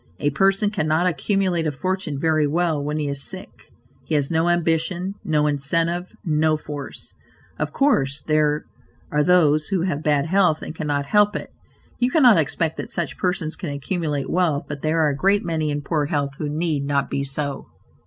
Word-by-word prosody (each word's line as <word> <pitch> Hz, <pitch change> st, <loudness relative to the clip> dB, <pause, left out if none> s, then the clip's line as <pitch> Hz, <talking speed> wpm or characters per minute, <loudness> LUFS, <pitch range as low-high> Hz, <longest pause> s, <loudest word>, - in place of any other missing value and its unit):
A 145 Hz, -, 0 dB
person 195 Hz, +7 st, +2 dB
cannot 160 Hz, -3 st, +1 dB
accumulate 180 Hz, 0 st, 0 dB
a -, -, 0 dB
fortune 185 Hz, -1 st, -3 dB
very 155 Hz, -1 st, +2 dB
well 160 Hz, -1 st, 0 dB
when 150 Hz, +1 st, -2 dB
he 150 Hz, -1 st, -1 dB
is 140 Hz, -1 st, -2 dB
sick. -, -, -10 dB, 0.3 s
He 155 Hz, -, -2 dB
has 145 Hz, 0 st, 0 dB
no 165 Hz, +1 st, +2 dB
ambition; 175 Hz, +2 st, 0 dB
no 150 Hz, -2 st, +1 dB
incentive; 165 Hz, +5 st, 0 dB
no 155 Hz, -1 st, +2 dB
force. 145 Hz, -2 st, -8 dB, 0.5 s
Of -, -, -1 dB
course, 150 Hz, -, +2 dB
there 150 Hz, -1 st, +1 dB, 0.5 s
are 150 Hz, -, +2 dB
those 155 Hz, -2 st, +4 dB
who 190 Hz, -3 st, 0 dB
have 165 Hz, -6 st, -1 dB
bad 145 Hz, -2 st, +2 dB
health 180 Hz, -2 st, +2 dB
and -, -, -6 dB
cannot 145 Hz, -3 st, -2 dB
help 210 Hz, +6 st, +3 dB
it: -, -, -5 dB, 0.5 s
you 245 Hz, -, +2 dB
cannot 250 Hz, -, +6 dB
expect 160 Hz, +1 st, -1 dB
that -, -, -6 dB
such 170 Hz, -5 st, -4 dB
persons 180 Hz, -4 st, -1 dB
can 175 Hz, -, -5 dB
accumulate 145 Hz, 0 st, -2 dB
wealth, 165 Hz, -5 st, +1 dB
but 145 Hz, -1 st, -6 dB
there 160 Hz, +1 st, +2 dB
are -, -, +3 dB
a 140 Hz, -, -1 dB
great 195 Hz, +7 st, +2 dB
many 160 Hz, -2 st, -1 dB
in 145 Hz, 0 st, -2 dB
poor 150 Hz, 0 st, 0 dB
health 145 Hz, -2 st, -1 dB
who 150 Hz, -, -2 dB
need 155 Hz, -1 st, -1 dB
not 140 Hz, 0 st, -1 dB
be 140 Hz, -, -1 dB
so. 140 Hz, +1 st, -3 dB
155 Hz, 185 wpm, -22 LUFS, 145-175 Hz, 0.5 s, cannot